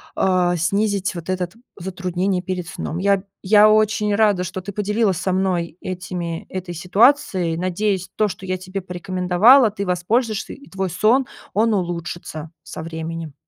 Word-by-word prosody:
а, 180 -2 +2
снизить 200 +2 0
вот 170 -1 -7
этот 180 -1 -2 0.3
затруднение 185 0 -2
перед 180 -2 -4
сном. 165 0 -5
Я 200 +1 +3
б 190 - -10 0.2
я 210 +2 +6
очень 215 -1 +2
рада, 205 -4 +3
что 185 +1 -5
ты 200 - -6
поделилась 210 -1 0
со 180 +2 -1
мной 180 -3 -1
этими, 180 -2 -5
этой 185 -1 -5
ситуацией, 185 - +2
надеюсь, 185 +1 -1
то, 215 - +2
что 195 -1 -7
я 185 0 -1
тебе 185 +2 -6
порекомендовала, 185 +7 +4
ты 200 -1 -4
воспользуешься, 210 +5 0
и 280 - -15
твой 190 -1 -2
сон, 220 +9 +3 0.3
он 220 +2 +2
улучшится 170 -4 -4
со 160 - -7
временем. 160 -1 -6
185 Hz, 155 wpm, -21 LUFS, 175-205 Hz, 0.3 s, я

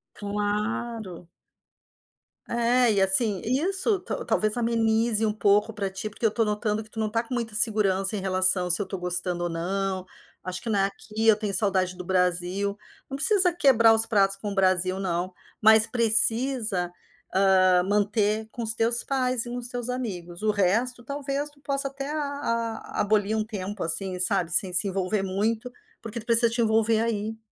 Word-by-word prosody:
Claro. 210 -2 -5 1.2
É, 235 +1 +1
e 200 - 0
assim, 195 +1 +6
isso 380 - -1
ta - - -6
talvez 215 0 -1
amenize 225 -1 0
um 210 - -1
pouco 210 +1 0
pra 200 -2 -4
ti, 195 +3 -6
porque 220 +2 -6
eu 220 - +2
tô 225 +1 -1
notando 210 0 -3
que 215 - -17
tu 225 - -14
não 215 -1 -2
tá 230 +2 -1
com 240 - -9
muita 230 -3 -4
segurança, 205 -3 +2
em 200 - -4
relação, 185 -1 +3
"se 175 +3 +4
eu - - -4
tô 190 0 -7
gostando 180 0 -3
ou - - -3
não. 185 +3 -4 0.4
Acho 185 0 -6
que 230 - -7
não 205 -2 0
é 195 - +2
aqui, 215 +3 -5
eu 220 - +6
tenho 210 -1 -5
saudade 190 -3 0
do 180 - -9
Brasil". 180 +2 -1 0.3
Não 270 - -6
precisa 370 +4 +7
quebrar 250 -9 +3
os 225 0 +4
pratos 195 -3 +1
com 205 +1 -6
o - - -7
Brasil 185 -1 +1
não, 185 -1 -4 0.3
mas 220 0 +5
precisa, 230 -3 +4 0.5
hã, 185 -2 +3
manter 210 +2 -1
com 235 - -8
os 220 0 +7
teus 230 +1 0
pais 255 -3 -1
e - - -9
com 245 - -6
os 245 -1 +1
seus 245 0 -3
amigos. 185 -9 -6
O 215 0 0
resto, 225 +5 -1
talvez 280 +2 -5
tu 290 -1 -23
possa 275 0 -3
até 275 +1 -8
a 305 - -4
a 230 -6 -4
abolir 210 0 0
um 215 - -1
tempo, 205 -2 -7
assim, 180 +3 +2
sabe. 180 -2 +1
Sem 185 +1 +3
se 180 +3 +3
envolver 195 +1 -2
muito, 215 +5 -3 0.3
porque 230 +1 -8
tu 215 - -13
precisa 230 0 +5
te 235 +1 -3
envolver 220 0 +1
aí. 220 -1 -4
215 Hz, 190 wpm, -24 LUFS, 190-235 Hz, 1.2 s, precisa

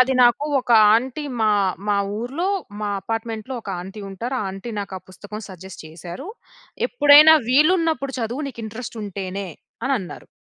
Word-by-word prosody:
అది 260 +1 +4
నాకు 240 +4 +4 0.2
ఒక 245 - -9 0.2
ఆంటీ 260 +5 -1 0.2
మా 215 - +3 0.4
మా 205 - +3 0.2
ఊర్లో, 275 - -2 0.3
మా 210 - -2
అపార్ట్మెంట్‌లో 225 +3 -4
ఒక 200 - -6
ఆంటీ 190 +4 -9
ఉంటారు. 240 +7 -4
ఆ - - -2
ఆంటీ 195 +5 -7
నాకా 195 -1 -6
పుస్తకం 205 +3 -9
సజెస్ట్ 190 0 -10
చేసారు. 170 - -9 0.6
"ఎప్పుడైనా 305 -6 +8
వీలున్నప్పుడు 305 -1 +2
చదువు, 240 +7 -3
నీకింట్రస్ట్ 225 -1 -7
ఉంటేనే" 195 -1 -5 0.4
అనన్నారు. 240 -10 -3
230 Hz, 140 wpm, -22 LUFS, 200-270 Hz, 0.6 s, ఎప్పుడైనా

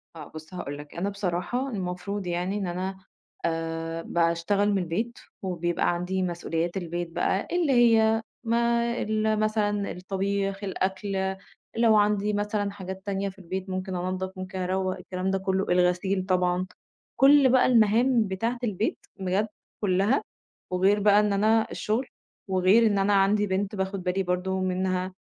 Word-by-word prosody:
آه 160 - -8
بُص 155 +2 -11
هاقول 145 -5 -5
لك، 145 0 -11
أنا 190 +4 -1
بصراحة 200 +7 -2
المفروض 190 -2 -4
يعني 180 +4 -1
إن 195 -3 -2
أنا 185 +2 -3 0.5
آآ 165 0 -2
باشتغل 170 +5 +1
من 200 - +2
البيت، 190 +7 -2 0.2
وبيبقى 175 -2 0
عندي 185 +2 -2
مسؤوليات 170 0 -2
البيت 175 -1 -3
بقى، 190 +3 0
اللي 345 -5 +2
هي 225 -2 +5 0.2
ما 235 0 +2 0.2
ال 215 0 0
مثلًا 210 -2 0
الطبيخ، 195 +2 -2
الأكل، 190 0 -2 0.4
لو 230 -2 +5
عندي 210 0 +2
مثلًا 205 0 -1
حاجات 190 -1 -7
تانية 200 0 -1
في 195 0 -14
البيت، 190 +1 -5
ممكن 185 0 -3
أنَضف، 185 +1 -3
ممكن 185 0 -6
أروّق، 185 +1 -1
الكلام 185 +1 -3
ده 195 - +1
كله، 190 0 0
الغسيل 180 +2 +2
طبعًا، 180 -1 +1 0.5
كل 275 0 +6
بقى 255 0 +5
المهام 230 0 +4
بتاعة 230 +6 -2
البيت 210 -1 -1 0.2
بجد 190 +3 0 0.3
كلها، 200 +6 +2 0.5
وغير 190 +3 +3
بقى 205 0 +5
إن 210 -1 +2
أنا 220 +2 +3
الشغل، 230 +5 -1 0.4
وغير 190 +4 +4
إن 205 -2 +2
أنا 195 +1 +2
عندي 205 +2 +3
بنت 195 +2 -1
باخد 190 -1 -3
بالي 185 +1 0
برضه 185 +1 -1
منها، 185 0 -1
190 Hz, 150 wpm, -26 LUFS, 180-210 Hz, 0.5 s, كل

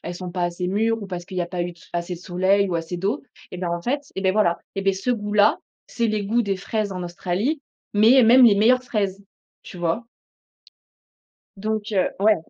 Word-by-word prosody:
sont 180 0 -6
pas 180 -1 -2
assez 175 +1 -2
mûres 225 +3 0
ou 200 - -6
parce 175 -2 -6
qu'il 185 -1 -8
y - - +2
a 175 - -3
pas 175 0 -2
eu 175 0 -5 0.2
assez 175 +1 -2
de 170 - -8
soleil 190 +2 +1
ou 175 - -1
assez 165 +1 -3
d'eau. 205 +11 -2 0.3
Et 180 - -6
bah, 175 -1 -2
en 170 0 -2
fait, 280 +8 -1
et 190 - -3
beh, 190 - +2
voilà! 190 -5 +2 0.2
Et 195 - -2
beh, 195 0 +3
ce 195 +6 -4
goût 210 -3 -1
là, 210 +1 +5 0.3
c'est 235 -1 -1
le 215 0 0
goût 230 +4 +1
des 200 -1 -1
fraises 215 +1 -2
en 185 -1 -4
Australie, 185 - -2 0.3
mais 230 +6 +6
même 245 +2 +7
les 215 - +7
meilleures 245 +5 +4
fraises, 200 -5 -2 0.4
tu - - -10
vois? 175 +8 -1 1.5
Donc 215 +1 -3
heu, 185 -2 +2
ouais. 215 +2 +5
195 Hz, 220 wpm, -23 LUFS, 180-220 Hz, 1.5 s, même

